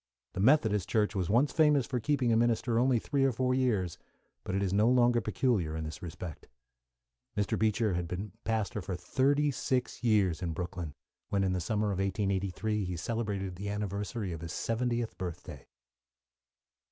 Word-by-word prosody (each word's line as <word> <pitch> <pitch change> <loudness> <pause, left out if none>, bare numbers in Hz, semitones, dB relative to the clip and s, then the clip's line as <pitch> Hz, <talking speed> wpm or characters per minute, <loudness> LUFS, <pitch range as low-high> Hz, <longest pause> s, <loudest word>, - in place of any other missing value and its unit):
The - - -5
Methodist 110 - +3
Church 105 -2 +2
was 95 -2 -1
once 125 +7 +3
famous 150 -5 +4
for 125 0 -2
keeping 130 -1 +1
a - - +4
minister 115 0 +2
only 125 0 +3
three 135 +4 0
or 135 - +4
four 130 +2 0
years, 110 -10 0 0.4
but 95 - -3
it 100 - +1
is 95 -1 0
no 105 +3 +4
longer 120 -1 +4
peculiar 100 -6 0
in 80 - -3
this 80 -1 -6
respect. 85 -2 -7 0.9
Mr. 105 -1 +1
Beecher 110 -1 +1
had 85 0 -2
been 95 +4 -5
pastor 110 -3 -1
for 95 0 -4
thirty 140 +9 +2
six 125 -1 -2
years 100 -8 +3
in 85 -3 -2
Brooklyn 90 -4 -5 0.3
when, 100 -1 +1
in 95 -1 +1
the 90 - -1
summer 105 +4 0
of 95 - -2
1883, 100 +2 -1
he 90 -2 -3
celebrated 100 -2 -3
the 100 +2 -4
anniversary 105 0 -3
of 80 -2 -6
his 85 +1 -5
seventieth 120 +1 -1
birthday. 90 -3 -7
105 Hz, 175 wpm, -31 LUFS, 95-120 Hz, 0.9 s, famous